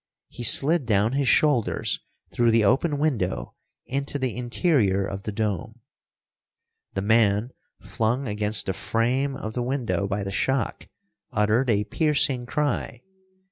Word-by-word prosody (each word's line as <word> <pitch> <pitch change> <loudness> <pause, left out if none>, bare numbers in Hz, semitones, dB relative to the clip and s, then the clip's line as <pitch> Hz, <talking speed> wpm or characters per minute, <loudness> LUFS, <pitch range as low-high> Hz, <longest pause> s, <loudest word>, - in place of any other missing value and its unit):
He - - -10
slid 140 +5 +4
down 105 0 +2
his 140 -1 0
shoulders 145 -7 +2 0.3
through 120 -1 +2
the 115 -2 +3
open 145 - +2
window 130 -12 -1 0.3
into 140 +2 -3
the 130 -4 -2
interior 120 - +1
of 95 0 -5
the 105 - -5
dome. 105 -5 -3 1.2
The 95 - -1
man, 110 +1 +2 0.3
flung 120 +4 -2
against 105 -2 +1
the 95 - -1
frame 125 +9 -1
of 110 -3 -6
the 125 - -2
window 120 -5 -1
by 100 0 -2
the 100 - -4
shock, 130 +6 -1 0.4
uttered 110 +5 +1
a 105 -2 +2
piercing 135 +1 0
cry. 145 -4 -2
115 Hz, 140 wpm, -24 LUFS, 105-135 Hz, 1.2 s, slid